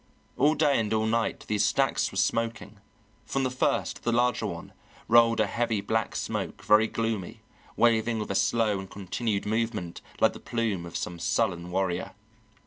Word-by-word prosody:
All 150 +3 +3
day 145 -4 +3
and 110 -2 -1
all 110 0 +1
night 115 +1 -1
these 105 -1 +1
stacks 135 -1 +1
were 95 - -7
smoking; 115 -1 -1 0.4
from 135 - -2
the 130 - 0
first, 130 - -1
the 120 - 0
larger 120 0 +1
one, - - -7 0.3
rolled 115 0 +5
a - - +4
heavy 115 -3 -1
black 110 +2 -1
smoke, - - -4
very 110 +1 +5
gloomy, 110 -5 -3 0.3
waving 115 -1 +3
with 105 - -3
a - - 0
slow 105 0 +1
and 95 -1 -8
continued 100 +2 -3
movement 110 -5 -2 0.2
like - - +4
the - - -10
plume 110 -7 -2
of 85 - -5
some 85 -1 -5
sullen 90 -2 0
warrior. 90 -1 -2
110 Hz, 170 wpm, -27 LUFS, 100-115 Hz, 0.4 s, rolled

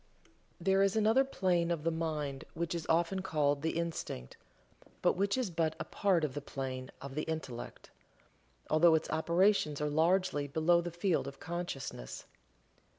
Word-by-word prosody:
There 190 +2 +3
is 195 0 +3
another 220 +4 +4
plane 180 -9 +1
of 170 -3 -1
the 165 - +1
mind 155 -4 -3
which 170 +1 -2
is 170 -2 -4
often 170 +3 +2
called 145 -6 +1
the 160 +1 -1
"Instinct," 165 - -4 0.7
but - - +4
which 200 +4 0
is 245 -8 -1
but 160 -1 0
a - - -1
part 190 -5 +1
of 145 -4 -1
the 145 - -4
plane 130 -2 -5
of 140 -1 -8
the 155 - -1
Intellect, 155 -8 -6 0.8
although 160 +1 +5
its 160 - -1
operations 170 -1 +2
are 150 0 -1
largely 165 -1 +2
below 160 +4 +3
the 175 - -4
field 175 -4 0
of 135 0 -8
consciousness. 150 - -5
165 Hz, 160 wpm, -33 LUFS, 150-180 Hz, 0.8 s, although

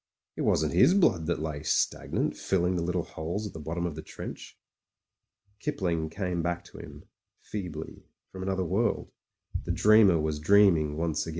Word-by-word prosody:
It - - -4
wasn't 80 0 +1
his 95 - +5
blood 90 - +3
that 85 - 0
lay 75 -2 -4
stagnant, 75 - 0
filling 90 -1 0
the 85 - -1
little 90 0 -1
holes 85 +7 -4
at 105 - -6
the 80 - -7
bottom 85 +3 -3
of 85 - -2
the 80 - -7
trench.... - - -9 1.0
Kipling 85 -6 -1
came 90 0 -2
back 85 +1 -2
to - - -13
him - - -11 0.2
— - - -53
feebly, 85 -6 -6 0.2
from 95 - -8
another 95 -1 -1
world. 100 +8 0 0.5
The - - -1
dreamer 105 -5 +5
was 75 -1 -1
dreaming 80 -4 +4
once 80 -1 -1
again. - - -4
85 Hz, 175 wpm, -28 LUFS, 80-95 Hz, 1.0 s, his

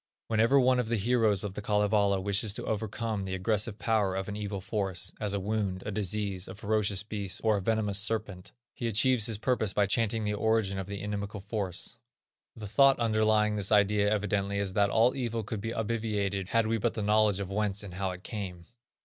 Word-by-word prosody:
Whenever 115 +5 +4
one 130 -1 +4
of 120 -3 -1
the 120 - +1
heroes 110 -2 +2
of 100 -2 -4
the 105 - -5
Kalevala 105 -1 +2
wishes 100 +2 0
to - - -5
overcome 110 -1 -2
the 95 0 -3
aggressive 105 +2 0
power 110 -4 +1
of 95 0 -3
an 100 - -4
evil 105 -1 -4
force, 95 -2 -2
as 105 -2 -2
a 100 - 0
wound, 100 -2 -2
a - - -3
disease, 100 -2 -2
a 95 - -8
ferocious 105 -2 0
beast, 100 -3 -3
or 110 -1 +3
a 100 - -1
venomous 105 -1 +1
serpent, 105 -3 -3 0.2
he 120 - -3
achieves 115 +1 +3
his 110 -3 -2
purpose 110 -3 0
by 100 - +3
chanting 110 +2 0
the 105 0 -1
origin 105 -2 +1
of 95 - -5
the 100 0 -6
inimical 105 0 -4
force. 100 +2 -4 0.6
The 110 - -8
thought 135 +6 +5
underlying 110 -2 +2
this 100 0 0
idea 105 0 +3
evidently 100 -1 0
is 100 -2 -1
that 100 0 +3
all 115 +4 +3
evil 115 -4 -2
could 105 0 -5
be 115 +2 -3
obviated 105 -4 -2
had 115 +2 +2
we 115 +1 0
but - - 0
the 110 - -2
knowledge 105 -1 +3
of 100 -1 -5
whence 105 0 -1
and 100 -3 -8
how 95 +1 -2
it 90 0 -7
came. 95 -6 -6
105 Hz, 210 wpm, -29 LUFS, 100-110 Hz, 0.6 s, thought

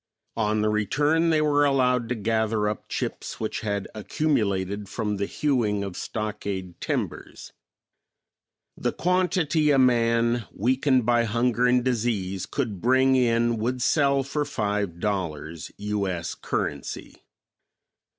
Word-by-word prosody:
On 110 -1 +1
the 105 - +2
return 145 +10 +2
they 155 -1 +3
were 145 -1 +3
allowed 125 -4 +2
to 125 - 0
gather 110 0 0
up 105 -1 -4
chips - - -4
which 110 - -2
had 100 -2 -2
accumulated 100 -6 -1
from 105 -1 -2
the 100 0 -1
hewing 115 -9 0
of 100 -2 -5
stockade 100 -4 -4
timbers. - - -4 1.2
The - - -2
quantity 180 -4 +1
a 140 - +4
man, 120 -2 +3
weakened 130 +2 +2
by 120 0 +3
hunger 120 +2 +1
and 125 0 +3
disease, 105 -7 -1
could 110 -10 -3
bring 130 +2 +4
in 120 -2 +2
would 125 +4 -1
sell 140 -2 +3
for 145 +2 -2
five 105 - -2
dollars, 85 -5 -3
U. 105 -1 -2
S. 85 -3 -3
currency. - - -4
115 Hz, 130 wpm, -25 LUFS, 105-130 Hz, 1.2 s, a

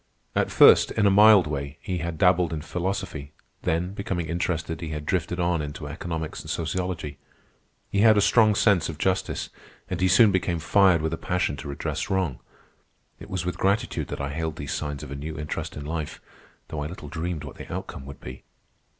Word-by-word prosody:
At - - +2
first, - - +7
in 105 - +1
a 100 - +5
mild 105 -2 +7
way, 70 0 -4
he 90 -2 -3
had 85 -1 -4
dabbled 90 -1 +3
in 75 -2 -4
philosophy; 90 -5 -4 0.3
then, 90 +4 -1
becoming 95 -4 -3
interested, 85 0 -2
he 80 - -4
had 75 -1 -5
drifted 90 +1 -1
on 85 -2 +1
into 75 0 -6
economics 80 +2 -5
and - - -10
sociology. 80 -4 -3 0.7
He 100 - +1
had 110 0 +6
a - - +6
strong 110 +1 +5
sense 95 -6 +3
of 80 - -6
justice, 95 +3 -1 0.4
and 90 -1 -2
he 95 - +4
soon 100 +4 +6
became 90 -2 0
fired 90 0 +4
with 80 0 -1
a - - -2
passion 90 -5 -1
to 75 - -7
redress 70 - -3
wrong. 95 -9 0 0.8
It - - -11
was 90 -2 -3
with 90 - -3
gratitude 100 +3 0
that - - -5
I 70 0 -2
hailed 80 0 -3
these 70 -4 -4
signs 75 -2 -4
of - - -8
a - - -4
new 75 +3 -6
interest 75 0 -4
in 75 - -6
life, 80 -1 -4 0.5
though 75 - -4
I 75 - -2
little 80 -2 -9
dreamed 80 +1 -4
what - - -9
the - - -9
outcome 65 - -6
would 70 - -9
be. 65 0 -9
85 Hz, 200 wpm, -25 LUFS, 75-95 Hz, 0.8 s, first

